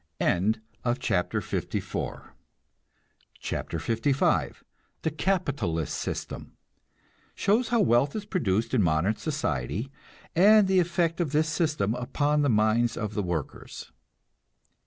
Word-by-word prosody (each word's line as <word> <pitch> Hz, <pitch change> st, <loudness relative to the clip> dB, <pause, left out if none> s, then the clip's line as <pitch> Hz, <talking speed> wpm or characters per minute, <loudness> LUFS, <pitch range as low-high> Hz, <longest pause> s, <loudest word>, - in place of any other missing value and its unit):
CHAPTER 110 Hz, 0 st, 0 dB
LV -, -, -4 dB, 2.8 s
THE 160 Hz, -, 0 dB
CAPITALIST 145 Hz, -, -1 dB
SYSTEM -, -, -5 dB, 0.8 s
(Shows 220 Hz, +4 st, +2 dB
how 235 Hz, -2 st, +2 dB
wealth 140 Hz, -, +3 dB
is 210 Hz, -1 st, -4 dB
produced 115 Hz, -, 0 dB
in 125 Hz, -, +4 dB
modern 85 Hz, +4 st, +2 dB
society, 130 Hz, -, -2 dB, 0.4 s
and 205 Hz, +3 st, +6 dB
the 190 Hz, -1 st, +4 dB
effect 170 Hz, -1 st, +1 dB
of 160 Hz, -6 st, -1 dB
this 155 Hz, +1 st, +2 dB
system 150 Hz, -, 0 dB
upon 145 Hz, +4 st, 0 dB
the 145 Hz, -, +2 dB
minds 110 Hz, +1 st, +2 dB
of 105 Hz, -1 st, -3 dB
the 105 Hz, -, -1 dB
workers.) 85 Hz, -6 st, -5 dB
130 Hz, 100 wpm, -27 LUFS, 105-170 Hz, 2.8 s, and